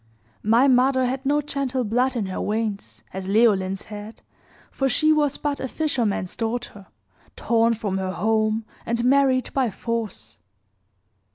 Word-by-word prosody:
My 230 +6 +4
mother 260 0 +4
had 265 +2 -2
no 295 +1 +3
gentle 275 -3 -2
blood 250 +4 +1
in 225 -4 -1
her 190 - -4
veins, 215 -1 -3
as 190 0 -5
Leoline's 195 -3 +2
had, 210 +1 -9 0.5
for 270 -1 0
she 310 +4 +4
was 295 -2 +1
but 290 -1 -2
a 265 - -3
fisherman's 240 - -1
daughter, 225 -4 -4 0.5
torn 230 0 +2
from 205 -3 -2
her 190 -1 -2
home, 220 +1 +1 0.2
and 235 +1 -1
married 265 -1 +3
by 260 -3 +1
force. 230 - -4
230 Hz, 145 wpm, -23 LUFS, 210-265 Hz, 0.5 s, My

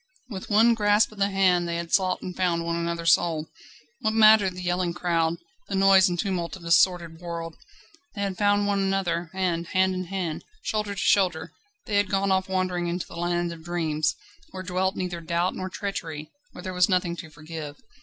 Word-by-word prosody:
With 190 -3 -7
one 225 +3 +5
grasp 210 -1 +3
of 215 - -14
the 200 0 +2
hand 185 -3 +2
they 170 - -2
had 170 0 -5
sought 185 -2 +2
and 180 - -6
found 170 -2 0
one 170 0 -1
another's 170 -1 +1
soul. 160 -3 0 0.5
What 220 -3 -1
mattered 215 -4 +6
the 180 - -7
yelling 175 -1 -1
crowd, 170 -2 0 0.3
the 200 - -3
noise 195 -1 +6
and 175 - -2
tumult 175 -4 -2
of 185 - -13
this 170 0 +5
sordid 170 -3 -1
world? 170 -1 -6 0.6
They 200 - -4
had 195 -2 -2
found 205 +1 +2
one 200 -1 +1
another, 190 -4 -1
and, 175 -3 -1
hand 190 +1 +2
in 185 0 -3
hand, 175 -4 -4 0.2
shoulder 210 -2 -2
to - - -5
shoulder, 180 -5 +2 0.3
they 205 - 0
had 205 -1 +2
gone 195 0 +1
off 190 0 +1
wandering 185 -2 -1
into 175 +1 -3
the - - -12
land 175 0 -1
of 160 -1 -12
dreams, 160 -3 -1 0.3
where 185 0 -7
dwelt 185 +2 -1
neither 175 -2 -4
doubt 170 +2 0
nor 185 0 -5
treachery, 180 -6 -5 0.2
where - - -11
there 185 -2 -5
was 180 +1 +3
nothing 180 -2 +1
to 160 - -8
forgive. 155 -1 -8
180 Hz, 205 wpm, -25 LUFS, 170-195 Hz, 0.6 s, mattered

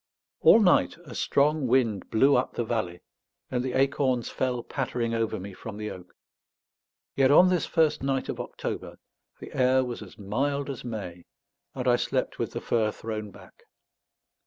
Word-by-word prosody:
All - - +7
night 185 -6 +3
a 130 - -10
strong 145 +3 +1
wind 115 -6 +1
blew 135 +6 +4
up 125 - 0
the 120 - 0
valley, 110 -7 -3 0.5
and 125 -1 0
the 130 -1 -3
acorns 135 -2 +1
fell 125 -2 -2
pattering 125 -4 -2
over 115 -3 -1
me 95 +1 -8
from 105 +2 -8
the 105 0 -4
oak. 90 -1 -12 1.0
Yet 135 -1 +4
on 175 +6 +7
this 180 -2 +1
first 160 -2 +2
night 135 -1 -1
of - - -4
October, - - -5 0.4
the - - -10
air 130 0 +3
was 120 -2 -6
as 100 -4 -12
mild 140 +7 -1
as 135 - -8
May, 95 -7 -6 0.5
and - - -3
I - - +5
slept - - -2
with - - -2
the - - -4
fur 110 -2 +1
thrown 110 -1 -5
back. - - -17
125 Hz, 170 wpm, -27 LUFS, 110-135 Hz, 1.0 s, All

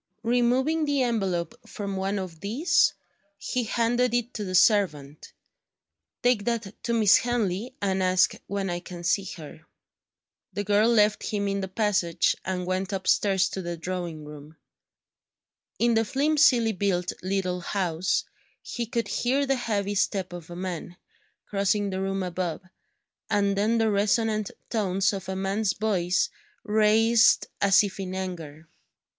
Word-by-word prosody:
Removing 250 +7 +2
the 285 -2 +1
envelope 195 -5 -1 0.2
from 200 -2 -5
one 195 +2 -1
of 180 -4 -6
these, 235 - +2 0.4
he 245 +4 -2
handed 240 +2 +1
it 240 +1 -1
to 215 - -4
the 185 -2 -3
servant: 170 -8 +2 0.9
"Take 245 -4 +3
that 230 -4 -2
to 235 - 0
Miss 215 -4 +6
Henley, 235 0 -2
and 190 -1 0
ask 185 0 +3
when 195 -2 -2
I 175 - -2
can 175 -1 -9
see 190 +3 +1
her." 155 0 -11 0.9
The 205 +2 -2
girl 210 +3 +3
left 210 -2 +3
him 200 -1 -1
in 200 0 -1
the 190 - -3
passage, 190 -4 +1
and 180 -1 -3
went 185 +1 -2
upstairs 195 0 +2
to 190 - -5
the 175 -1 -5
drawing 170 -3 -5
room. 150 +1 -12 1.2
In 235 +3 +2
the 225 0 +3
flimsily 270 -2 +3
built 185 -3 -1
little 185 -1 -1
house, 180 -1 -1 0.4
he 235 -2 -4
could 230 -1 -2
hear 265 +6 0
the 270 - +1
heavy 205 -5 -2
step 190 -2 -1
of 175 -2 -9
a 175 - -8
man, 175 -1 -5 0.5
crossing 200 0 0
the 190 0 -3
room 195 0 -2
above, 180 -2 -3 0.7
and 200 -1 +1
then 215 +4 +1
the 225 -1 +2
resonant 215 +1 +1 0.2
tones 195 -2 +1
of 190 -1 -6
a 190 - -2
man's 195 +2 0
voice 185 -5 0 0.3
raised 220 +2 +4 0.2
as 200 +1 +5
if 200 -1 -5
in 185 -1 -4
anger. 165 -5 -6
200 Hz, 150 wpm, -26 LUFS, 185-225 Hz, 1.2 s, Miss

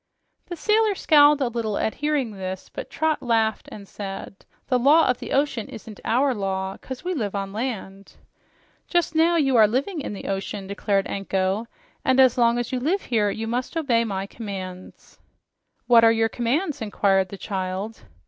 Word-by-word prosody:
The 350 - -5
sailor 425 +3 +2
scowled 295 -4 +5
a 260 - +2
little 230 -3 -2
at 220 - 0
hearing 295 -5 -1
this, 190 -2 -6
but - - -7
Trot 315 0 0
laughed 225 -3 0
and 200 -1 -10
said, 195 -1 -7 0.3
"The 255 -2 +2
law 295 +6 +5
of 250 -1 +1
the - - -7
ocean 275 -5 0
isn't 220 -1 -10
OUR 260 +3 +2
law, 190 -2 -3
'cause 260 -2 -8
we 365 +1 -2
live 210 - -3
on 195 -1 -3
land." 205 -4 -5 0.7
"Just 345 -2 +1
now 330 +2 +3
you 275 -5 +2
are 215 -2 +7
living 280 - -1
in 215 - -5
the 200 - -8
ocean," 195 +1 -3
declared 200 0 0
Anko, 195 +2 -1 0.4
"and 260 0 +2
as 260 -2 +6
long 235 -1 +3
as 240 -1 -3
you 255 - -1
live 340 +10 0
here, 215 -4 +1
you 220 +2 -4
must 245 +7 -3
obey 245 -8 +2
my 195 -3 -3
commands." 190 -4 -8 0.7
"What 235 -2 +6
are 225 - +7
your 225 0 +2
commands?" 280 - -1
inquired 195 -3 +1
the 200 - -8
child. 190 +2 -4
230 Hz, 180 wpm, -24 LUFS, 200-275 Hz, 0.7 s, are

